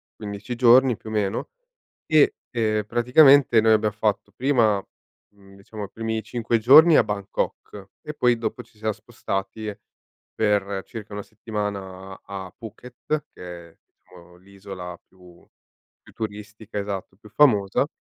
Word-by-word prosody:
15 105 +3 -6
giorni, 125 +1 +5
più 110 - -11
o - - -6
meno, 100 -2 -1 0.6
e, 155 -2 +4 0.2
ehm, 110 -3 0
praticamente 125 +2 +5
noi 110 0 +4
abbia 110 0 +2
fatto 105 -1 -2
prima 115 -5 +2 0.5
mhmm, 100 -1 -19
diciamo 105 +2 -9
i 100 - -15
primi 110 -1 -3
5 115 +1 -1
giorni 150 +8 +8
a - - +5
Bangkok 100 0 -5
e 150 - -7
poi 125 -4 +2
dopo 115 -1 -4
ci - - -27
siamo 110 0 -2
spostati 100 +2 -5 0.6
per 100 -2 0
circa 110 -2 -9
1 100 0 -5
settimana 100 -3 -6
a 95 -2 -8
Phuket, 125 +6 -6
che 85 -1 -10
è, - - -32 0.4
uhm, 90 0 -16
l'isola 95 -2 -10
più 90 -2 -19 0.6
più - - -17
turistica, 105 -1 -7
esatto, 100 -2 -5
più 105 +1 -16
famosa. 110 -2 +3
105 Hz, 140 wpm, -23 LUFS, 100-115 Hz, 0.6 s, giorni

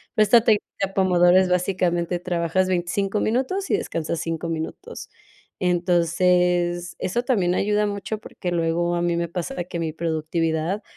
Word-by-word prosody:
pero 215 - +5
esta 230 +2 +6
técnica 200 -3 0
Pomodoro 180 -1 +4
es, 190 -1 +4
básicamente, 180 -1 0
trabajas 180 +1 0
25 190 +3 -1
minutos 265 - -1
y - - +4
descansas 165 0 -3
5 165 0 -3
minutos. 165 - -6 0.5
Entonces, 175 0 +1
eso 240 +7 -1
también 190 -9 +1
ayuda 210 +1 +1
mucho 200 +1 -4
porque 180 -4 -6
luego 170 +1 0
a 170 - -1
mí 175 -1 +1
me 170 -1 -2
pasa 180 +3 -4
que 175 -1 -5
mi 160 -2 -2
productividad 165 +3 -1
180 Hz, 150 wpm, -23 LUFS, 170-195 Hz, 0.5 s, esta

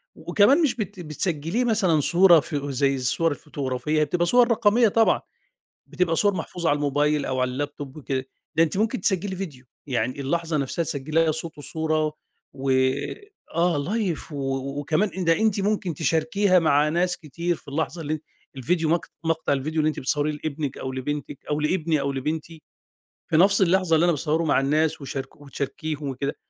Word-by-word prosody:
وكمان 245 +10 +3
مش 295 -6 +2
بت 205 -4 -5
بتسجلّيه 165 - -2
مثلًا 195 -9 +2
صورة 175 +2 +6
ف 150 +1 -5
زي 140 -1 0
الصور 135 +5 +1
الفوتوغرافية، 145 0 -2
هي 150 - +3
بتبقى 175 +4 0
صور 245 +5 +4
رقمية 225 +1 +4
طبعًا 225 +2 +3 0.7
بتبقى 175 -2 0
صور 205 +2 +3
محفوظة 175 -2 -2
على 145 - +3
الموبايل، 145 0 +1
أو 130 - -2
على 130 0 0
اللاب 145 +3 -3
توب 140 0 -8
وكده، 135 -2 -3 0.3
ده 165 - +5
أنتِ 165 +3 -1
ممكن 225 +4 0
تسجلّي 190 -1 0
فيديو، 150 -9 -7 0.2
يعني 125 +1 -1
اللحظة 165 +3 -1
نفسها 140 +4 -1
تسجلّيها 155 +2 0
صوت 160 +1 -6
وصورة 155 +1 -1 0.4
و 135 0 -4 0.9
آه 170 -1 +2
لايف 180 +1 -2
و 135 0 -3
وكمان 155 +8 +1
أن 185 - -2
ده 165 - +5
أنتِ 215 -2 +2
ممكن 200 -4 0
تشاركيها 165 +5 +2
مع 150 -2 +3
ناس 180 +2 0
كتير 170 +1 -3
في - - -19
اللحظة 160 +4 -3
اللي 155 0 -2
أن 155 - -3 0.4
الفيديو 160 +5 0
مق 170 +1 +1 0.2
مقطع 165 -2 0
الفيديو 155 +4 -2
اللي 155 - +2
أنتِ 155 - -4
بتصوّريه 145 +3 0
لإبنِك 145 -3 -3
أو 130 - -4
لبنتِك، 145 +2 -4
أو 150 0 0
لإبني 155 -1 +1
أو 140 0 -1
لبنتي، 155 +4 -4 0.7
في 155 - +3
نفس 195 +3 +5
اللحظة 185 -2 +3
اللي 160 - +3
أنا 175 - +4
باصوّره 160 +1 0
مع 150 - +3
الناس 155 +3 +1
وشارك 135 -1 -6
وتشاركيهم 145 +1 -4
وكده، 140 +2 -3
155 Hz, 175 wpm, -24 LUFS, 145-175 Hz, 0.9 s, صورة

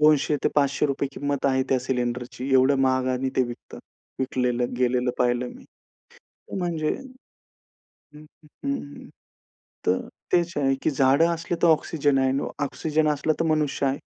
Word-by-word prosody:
₹200-500 145 -1 +2
किंमत 140 -1 -2
आहे 130 -1 +2
त्या 130 - +3
सिलिंडरची. 125 0 -3
एवढं 130 +2 +5
महागाने 130 0 +1
ते 130 - +4
विकतात. 120 0 -9 0.4
विकलेलं 125 -2 -1
गेलेलं 125 0 +2
पाहिलं 125 0 +1
मी. - - -13 0.6
तर - - -12
म्हणजे 165 -4 -1 1.3
हं, 150 +1 -12
हं, 150 0 -23 0.2
हं, 145 - -6 0.8
तर 90 +1 +2 0.3
तेच 170 -1 +2
आहे 135 -1 +2
की 155 - +2
झाडं 135 +4 +4
असले 170 +1 -3
तर - - +6
ऑक्सिजन 145 -3 +2
आहे 130 - +3
आणि 135 +1 -1 0.2
ऑक्सिजन 155 +2 0
असला 150 +1 +1
तर - - +2
मनुष्य 150 -3 +1
आहे. 135 +1 0
135 Hz, 140 wpm, -25 LUFS, 130-150 Hz, 1.3 s, तर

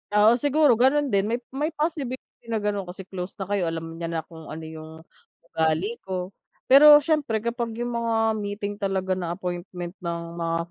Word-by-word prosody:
Oo, 220 +4 +6
siguro 290 +1 +4
ganun 275 +2 +3
din 200 0 +2
may 235 +2 -1
may 285 +3 -1
possibility 290 -7 -4
na 225 -2 -2
ganon 205 -2 -1
kasi 185 +2 -8
close 185 0 -7
na 200 - -4
kayo 195 -2 -1
alam 165 0 -5
niya 170 - -3
na 165 -1 -3
kung 160 -2 -13
ano 160 +1 -7
yung, 160 0 -9 0.6
ugali 160 +8 0
ko, 185 -1 -4 0.4
pero, 295 +2 +9
siyempre 290 -8 +1
kapag 235 -1 -2
yung 240 0 -2
mga 230 -1 0 0.2
meeting 205 0 -4
talaga 190 -2 0
na 175 -2 -3
appointment 175 0 -5
ng 170 -2 -3 0.2
mga 165 -1 -1
200 Hz, 180 wpm, -25 LUFS, 175-240 Hz, 0.6 s, pero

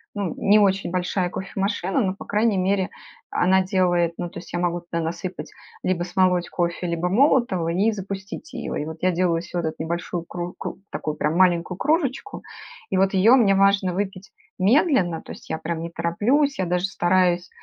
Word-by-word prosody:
ну, 200 -5 -2
не 210 +1 +4
очень 195 -3 +2
большая 180 0 -1
кофемашина, 195 +3 -2
но, 190 -4 0
по - - -10
крайней 210 0 +1
мере, 190 0 +1 0.4
она 190 +1 +3
делает, 175 -3 +1
ну, 175 - -3
то - - -11
есть - - -10
я 175 - -1
могу 175 0 -1
туда 170 -1 -4
насыпать: 170 +3 -5 0.3
либо 185 -2 0
смолоть 180 0 +1
кофе, 175 0 -2
либо 170 +1 -1
молотого- 240 - +3
и 195 +6 +2
запустить 195 +7 -7
ее. 255 - -4
И - - -6
вот 160 +1 -7
я 185 - +3
делаю 170 -1 +1
всё 175 +1 -7
вот 170 - -2
эту 160 - -4
небольшую 170 +1 -3
кру 175 +1 -5
кру - - -5
такую 155 -1 -3
прям 150 +1 0
маленькую 180 0 +2
кружечку 300 +3 -1 0.5
и 190 - +1
вот 195 +1 +2
ее 205 +6 +6
мне 210 -6 +4
важно 195 -1 +3
выпить 195 0 -4 0.3
медленно, 200 - +3
то - - -10
есть - - -12
я - - -2
прям 165 0 -4
не 170 - -4
тороплюсь. 215 - +1
Я 185 - +1
даже 180 +1 0
стараюсь 180 -1 +1
185 Hz, 190 wpm, -23 LUFS, 175-200 Hz, 0.5 s, ее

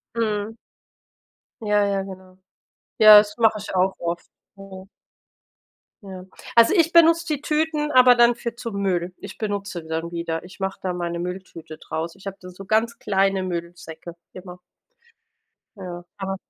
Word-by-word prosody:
Mhm. 215 -1 -2 1.1
Ja 210 -1 +2
ja, 195 -1 -1
genau. 185 -1 -12 0.6
Ja, 215 -1 +10
das 210 0 +3
mache 225 -2 +3
ich 205 - -8
auch 185 +1 +2
oft. 170 0 -4 0.3
Mhm. 195 -1 -12 1.1
Ja. 190 -2 -10 0.3
Also 230 - +6
ich 330 -2 +3
benutze 335 0 +5
die 295 -3 -2
Tüten 300 0 -1
aber 250 -1 +7
dann 240 0 +5
für 235 0 -6
zu 230 -2 -7
Müll. 185 -3 -1
Ich - - -10
benutze 200 -4 -4
sie 160 - -15
dann 165 +1 -3
wieder. 170 -1 -4
Ich 185 +2 -14
mache 190 0 -3
da 185 -1 -2
meine 170 -1 -4
Mülltüte 175 -3 -7
draus. 165 +1 -5
Ich 195 - -18
habe 195 0 -5
da 180 0 -11
so 195 +2 -11
ganz 225 +2 0
kleine 195 -1 +1
Müllsäcke 170 -1 -7 0.2
immer. 180 -1 -11 1.2
Ja, 175 -2 -8
aber 195 0 -4
195 Hz, 155 wpm, -23 LUFS, 180-220 Hz, 1.2 s, Ja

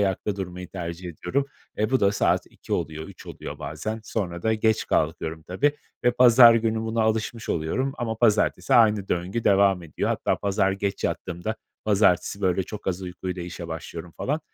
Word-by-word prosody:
ayakta 100 +1 0
durmayı 90 -2 -6
tercih 90 -1 -6
ediyorum. 135 - -2 0.3
Eee, 110 +3 0
bu 130 - +2
da 100 0 +4
saat - - +1
2.00 - - -9
oluyor, 80 +1 -2
3.00 - - -13
oluyor - - -8
bazen. 110 +9 -4
Sonra 90 -7 -3
da 110 0 +2
geç 110 0 +1
kalkıyorum 80 0 -1
tabii 115 - +1 0.3
ve 120 - +6
pazar 120 -1 +8
günü 115 -1 +1
buna 115 0 0
alışmış 110 +1 -1
oluyorum 105 +13 -1
ama 115 -2 -2
pazartesi 110 -3 +2
aynı 105 -4 +4
döngü 90 +7 -2
devam 95 -2 +4
ediyor. 80 -3 -3
Hatta - - 0
pazar 95 -1 +1
geç 100 0 -3
yattığımda 90 +5 -3 0.3
pazartesi 100 -2 +2
böyle 95 -1 +2
çok 105 +3 -9
az 95 0 -1
uykuyla 90 0 -5
işe 85 -1 -7
başlıyorum 80 +1 -7
falan. 150 +4 -1
100 Hz, 175 wpm, -25 LUFS, 90-110 Hz, 0.3 s, pazar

